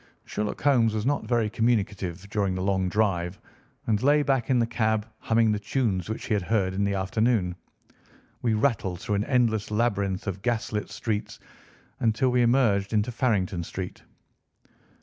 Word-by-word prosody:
Sherlock 105 0 -3
Holmes 120 -6 +3
was 110 0 -2
not 145 +2 0
very 120 -3 +2
communicative 100 -5 -1
during 100 -3 0
the 95 - -2
long 95 -1 +1
drive 90 -3 0 0.5
and 110 -2 +1
lay 145 +2 +4
back 135 -5 0
in 130 - +4
the 120 - +3
cab 110 -2 0
humming 115 -1 +2
the 105 - 0
tunes 105 -4 -1
which 110 - -4
he - - -1
had 105 - +1
heard 95 -1 0
in 100 +1 0
the 100 0 0
afternoon. 95 -1 +1 0.9
We 115 -2 +1
rattled 105 -7 0
through 105 - -3
an 100 0 +1
endless 115 -5 +1
labyrinth 100 -4 0
of 95 -2 -4
gas 120 0 -1
lit 105 -1 -3
streets 105 -3 -3 0.6
until 115 +3 +2
we 125 0 +3
emerged 115 -5 +2
into 110 +3 +1
Farrington 100 -8 0
Street. 90 +2 -6
105 Hz, 170 wpm, -26 LUFS, 100-120 Hz, 0.9 s, lay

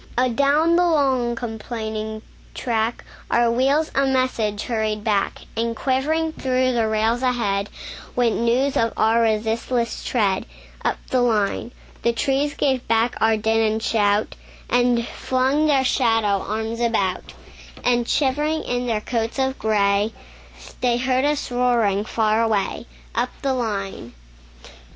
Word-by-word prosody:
Adown 280 +7 +3
the 355 - +4
long, 265 -7 +2
complaining 220 -2 -5 0.3
track, 230 -1 -1 0.2
Our 235 0 +3
wheels 275 +6 +2
a 275 - +2
message 245 -6 0
hurried 215 -2 -2
back; 205 -3 0
And 230 +1 -1
quivering 310 +6 0
through 255 -2 +1
the 230 -3 +1
rails 220 +2 +1
ahead, 210 -6 0 0.5
Went 240 -3 +1
news 250 +4 +1
of 230 0 +1
our 225 +1 +3
resistless 225 +2 0
tread, 205 -6 0 0.4
Up - - 0
the 255 - +3
line. 225 -1 0 0.3
The 235 - +1
trees 275 +4 0
gave 265 -3 0
back 230 +2 +2
our 220 0 +4
din 220 +1 +1
and 220 0 -3
shout, 205 -2 +1 0.4
And 245 -1 +2
flung 265 +4 0
their 275 -3 +3
shadow 225 -6 +2
arms 220 +2 -3
about; 200 -6 -1 0.5
And 240 -1 +1
shivering 295 +3 +1
in 245 0 -2
their 220 -3 0
coats 230 +1 -2
of 265 0 -1
gray, 205 0 +1 0.7
They 245 -1 +2
heard 255 +2 +1
us 295 -3 -1
roaring 235 -5 +1
far 220 0 +1
away, 220 0 -1 0.3
Up 240 +2 0
the 270 -1 +1
line. 200 - -4
235 Hz, 135 wpm, -22 LUFS, 220-260 Hz, 0.7 s, the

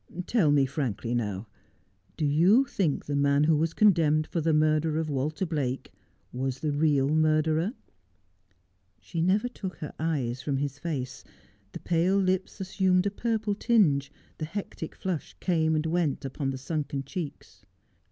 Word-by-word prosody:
' 180 - -4
Tell 200 -10 +2
me 140 -2 +4
frankly, 120 -5 -3
now, 105 -3 -2 0.7
do 155 - 0
you 180 - +5
think 175 - -1
the 145 - -2
man 140 0 +3
who 160 +1 +4
was 160 +2 0
condemned 160 -7 +4
for 165 - -2
the 160 +1 +2
murder 155 0 +2
of 160 -1 -1
"Walter 150 +6 -1
Blake 140 -6 -3 0.4
was 130 +1 -3
the 155 - 0
real 145 -2 +2
murderer? 155 +4 +2 0.7
' 90 -1 -42 0.3
She 165 -2 -4
never 195 +7 +2
took 195 -6 -6
her 150 - -7
eyes 135 -6 -1
from 140 -1 -1
his 140 0 -3
face. 140 -6 -4 0.5
The - - -7
pale 175 +3 +2
lips 185 +1 0
assumed 190 -1 +1
a 200 - +1
purple 220 0 -1
tinge, 155 -11 +2 0.3
the 155 - -2
hectic 170 -2 -6
flush 180 -5 -4
came 160 -3 +1
and 155 0 0
went 160 -4 0
upon 135 +1 -3
the 135 - -3
sunken 140 0 -3
cheeks. 140 - -7
155 Hz, 160 wpm, -28 LUFS, 140-175 Hz, 0.7 s, you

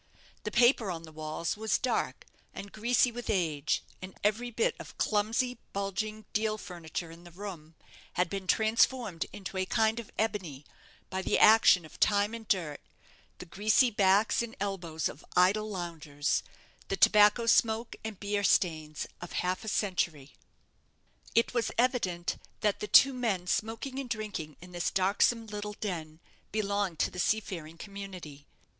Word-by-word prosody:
The - - 0
paper 240 -3 +4
on 165 -2 -4
the 160 - -11
walls 155 +1 -3
was 220 +1 0
dark 255 - -1 0.3
and 200 - -7
greasy 240 +3 +2
with 240 0 -7
age; 160 -7 0 0.2
and 185 0 -9
every 215 +4 +1
bit 230 -1 +1
of - - -10
clumsy, 225 +4 0
bulging 205 +2 -3
deal 215 0 0
furniture 170 -3 -6
in 165 +1 -13
the 175 - -12
room 170 -4 -9 0.4
had 180 0 +1
been 195 +1 -5
transformed 220 -3 +2
into 195 -2 -7
a 185 0 0
kind 220 +2 +2
of 230 - -8
ebony 185 -11 -2 0.5
by 190 0 -2
the - - +1
action 215 -5 +6
of 155 - -15
time 205 +1 +3
and 225 -2 -7
dirt, 165 -7 -1 0.6
the - - -9
greasy 215 - +3
backs 200 +2 +3
and 235 -1 -5
elbows 175 -6 -2
of 140 - -9
idle 205 +4 +3
loungers, 160 -6 -2 0.5
the - - -2
tobacco 210 +2 +6
smoke 230 0 +2
and 220 -3 -6
beer 205 0 -1
stains 155 -5 +1 0.2
of 175 - -8
half 185 +1 -1
a - - -9
century. 170 -9 -1 1.0
It 230 - +3
was 235 -2 +1
evident 225 -9 0 0.2
that 210 -2 +1
the 210 - -4
two 275 +5 +7
men 220 -8 -1
smoking 225 +8 -2
and 265 -3 -5
drinking 205 - -4
in 180 +1 -12
this 175 0 -1
darksome 205 +5 +2
little 210 -1 -5
den 165 -7 -5 0.3
belonged 200 -4 -1
to - - +1
the 180 - -7
seafaring 175 -5 -1
community. 185 -7 -9
200 Hz, 155 wpm, -30 LUFS, 175-220 Hz, 1.0 s, two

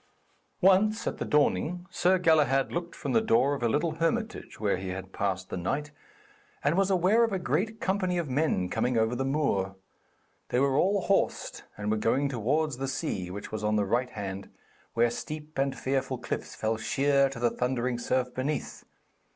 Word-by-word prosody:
Once, 195 +4 +4
at - - -3
the - - -2
dawning, 160 +4 +1
Sir 185 +2 +3
Galahad 150 -6 +3
looked 170 0 -4
from - - -4
the 225 - +4
door 220 -10 +3
of 140 - -4
a 120 - +2
little 150 +7 +1
hermitage 220 +6 -2
where 105 -3 +1
he 95 +1 -6
had 95 +1 -6
passed 95 -2 -2
the - - -2
night, 145 - -2 0.7
and - - +2
was 195 +1 +2
aware 195 +5 +4
of 230 - +1
a 195 - 0
great 185 - -1
company 190 -3 0
of 170 -3 -1
men 130 - +1
coming 115 +5 0
over 110 +2 +2
the 135 - -1
moor. 135 -9 0 0.7
They 125 - +1
were 135 0 +2
all 195 +6 +3
horsed, 195 +2 0
and 105 0 -2
were 110 - +1
going 130 +6 +1
towards 135 +4 0
the 135 +1 -3
sea, 135 - -3
which 100 +3 -7
was 110 -1 -4
on 105 0 +1
the 105 -1 +2
right 120 +5 0
hand, 100 -3 -6 0.5
where 120 0 +3
steep 150 +3 -6
and 135 0 0
fearful 135 -1 -1
cliffs 120 - -5
fell 110 0 -1
sheer 140 +5 +2
to 135 - -8
the 120 -1 +2
thundering 125 -1 -1
surf 125 +1 0
beneath. 140 +3 -3
135 Hz, 190 wpm, -28 LUFS, 115-170 Hz, 0.7 s, Once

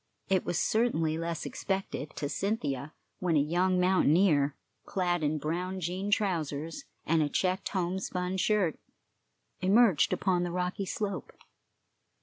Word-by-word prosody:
It 190 -2 +2
was 175 - -1
certainly 175 -10 +1
less 165 0 -3
unexpected 190 -6 -3
to 145 - -2
Cynthia 145 - -2 0.3
when 175 -3 +1
a - - +5
young 180 +5 +2
mountaineer, 165 -5 +3 0.3
clad 175 -2 0
in 155 +1 +1
brown 180 +5 -2
jean 185 +3 -3
trousers 165 -7 -1 0.2
and 165 0 +3
a 150 - +1
checked 185 +4 0
homespun 185 0 -2
shirt, 190 -4 +1 0.8
emerged 195 - +4
upon 180 -2 +1
the 175 - -1
rocky 180 +2 -2
slope. 200 -1 -3
180 Hz, 130 wpm, -30 LUFS, 155-190 Hz, 0.8 s, a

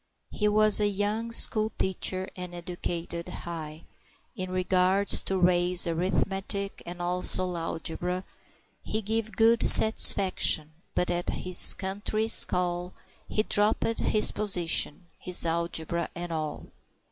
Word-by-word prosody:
He 210 - -3
was 215 0 +4
a 210 - +1
young 205 +3 -4
school 215 -1 +2
teacher, 190 0 -2
and 180 -1 -9
educated 170 -1 -7
high 160 -2 -10 0.5
In 185 0 -7
regards 185 +2 +2
to 190 - -4
Ray's 180 0 +1
arithmetic, 195 +3 -4
and 175 +1 -9
also 180 +1 -3
Alegbra. 170 +2 -5 0.6
He 215 +1 -6
give 220 +1 -4
good 230 +1 +3
satisfaction, 190 -7 +6 0.2
but 180 - -2
at 175 0 -4
his 180 -1 +5
country's 205 +3 0
call 180 0 -5 0.3
He 215 - -2
dropped 215 +2 -1
his 215 - 0
position, 175 -4 0
his 180 -1 +2
Alegbra 170 0 -4
and 175 0 -7
all. 155 -2 -6
185 Hz, 120 wpm, -25 LUFS, 175-205 Hz, 0.6 s, satisfaction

